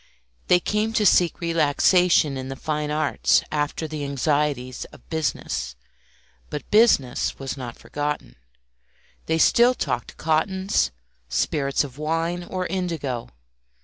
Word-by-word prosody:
They 180 - +5
came 210 +4 -1
to 215 -2 +2
seek 175 -3 +4
relaxation 165 -1 +3
in 130 0 -5
the 135 - -5
fine 150 +1 -3
arts 150 -1 +2
after 150 +1 -2
the 155 -1 -5
anxieties 140 -2 -1
of - - -17
business; 115 - -2 0.7
but 150 - -6
"business" 210 - +3
was 135 -1 -5
not 125 -4 -7
forgotten; 145 - -4 0.9
they 160 - +1
still 240 +9 +5
talked - - -3
cottons, 190 +5 +1 0.4
spirits 140 - 0
of 140 -1 -9
wine, 165 +3 -1
or 185 +1 -4
indigo. 165 -11 -3
155 Hz, 120 wpm, -24 LUFS, 140-175 Hz, 0.9 s, They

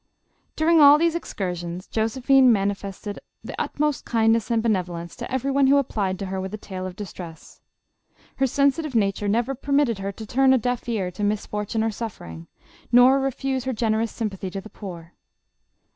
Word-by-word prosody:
During 320 0 +4
all 290 0 +9
these 335 +1 +2
excursions, 180 - -4
Josephine 255 +3 +3
manifested 200 0 -2
JOSEPHINE. - - -18
the - - -2
utmost 300 -2 -1
kindness 225 -1 +2
and 230 -1 +1
benevolence 175 -6 -2
to 240 0 -7
every 265 +1 -1
one 275 0 +3
who 280 +1 +5
applied 205 -8 -1
to 195 - -5
her 190 0 -3
with 190 +2 -5
a - - -7
tale 185 -3 -6
of 180 - -8
distress. 175 -4 -10 0.8
Her 270 - +2
sensitive 280 +2 +1
nature 205 -1 +1
never 235 +6 +1
permitted 275 -4 +1
her 195 +1 -3
to 220 +3 -9
turn 265 +4 +3
a - - +4
deaf 245 0 -2
ear 195 -6 -1
to 205 +4 -6
mis 205 +1 0
fortune 210 +1 -2
or 225 - 0
suffering, 85 - -7 0.4
nor 250 +3 +6
refuse 270 -1 -2
her 260 - -1
generous 225 0 0
sympathy 200 -4 -4
to 195 +2 -5
the 215 +2 -12
poor. 170 -4 -9
220 Hz, 180 wpm, -24 LUFS, 195-265 Hz, 0.8 s, all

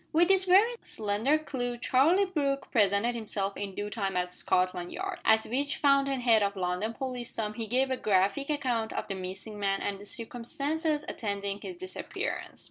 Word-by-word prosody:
With 340 +3 +4
this 385 -1 +5
very 410 +6 +5
slender 215 +8 0
clue 245 -6 -3
Charlie 305 +11 +4
Brooke 280 -7 -1
presented 205 +2 +3
himself 205 -4 -2
in 200 -2 -5
due 205 0 -4
time 195 -4 -2
at 180 0 -1
Scotland 180 -1 0
Yard, 385 -1 -4
at 220 0 +4
which 280 +4 -1
fountain 275 -2 +3
head 230 -3 +5
of 200 0 0
London 180 +3 -1
policedom 240 -4 -3
he 225 0 -5
gave 260 +3 +1
a 260 - 0
graphic 200 +8 +1
account 250 -7 0
of - - -3
the 195 - -3
missing 190 +3 -7
man 195 -1 +1
and 200 -1 -3
the 205 - -11
circumstances 290 - -2
attending 200 -1 -3
his 365 - -6
disappearance. 370 +1 -5
230 Hz, 175 wpm, -29 LUFS, 200-280 Hz, -, this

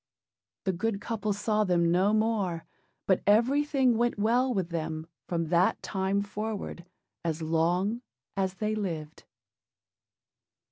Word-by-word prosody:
The 190 - 0
good 200 +3 -1
couple 215 0 -2
saw 210 +1 +1
them 170 -3 +2
no 185 +4 +3
more; 215 -6 0 0.4
but 190 - +3
everything 260 +3 +3
went 240 -1 +1
well 240 +5 +2
with 190 -7 -1
them 160 -1 -3 0.2
from 165 -2 -1
that 175 +2 +3
time 195 0 0
forward, 205 -3 -5 0.4
as 165 -1 -2
long 175 +8 +1 0.3
as 190 -1 -1
they 215 +2 -1
lived. 165 -7 -4
200 Hz, 125 wpm, -29 LUFS, 170-220 Hz, 0.4 s, no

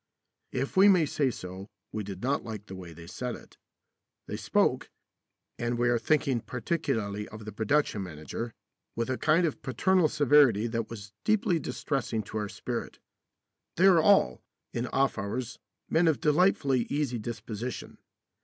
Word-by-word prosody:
If 135 +2 -2
we 190 +2 +7
may 180 -5 +5
say 140 -1 +1
so, 95 -3 -7 0.2
we 110 - -3
did 95 0 -7
not 140 +3 0
like 110 -3 -7
the 95 - -8
way 90 -2 -9
they 85 +1 -11
said 120 +7 -4
it. - - -16 0.7
They - - -5
spoke - - +1 0.7
and 120 0 -1
we 120 0 +2
are 120 -1 +2
thinking 135 -1 +1
particularly 110 -6 -2
of 110 0 -10
the 110 - -6
production 110 +2 +1
manager 90 +7 -5 0.4
with 115 +2 -1
a 130 - -1
kind 160 +3 +3
of 155 - -3
paternal 175 +6 +2
severity 145 -7 +5
that 115 -1 -2
was 105 -3 -9
deeply 200 -6 +2
distressing 125 -8 -2
to 110 +2 -4
our 105 -1 -3
spirit. - - -5 0.8
They 180 - +4
are 180 -4 +7
all, 195 - +4 0.3
in 120 +1 -2
off 135 +1 +1
hours, 110 +4 -4 0.3
men 165 +1 +3
of 155 -4 +3
delightfully 150 -6 +3
easy 140 -5 -1
disposition. 115 +1 -6
120 Hz, 160 wpm, -29 LUFS, 105-150 Hz, 0.8 s, we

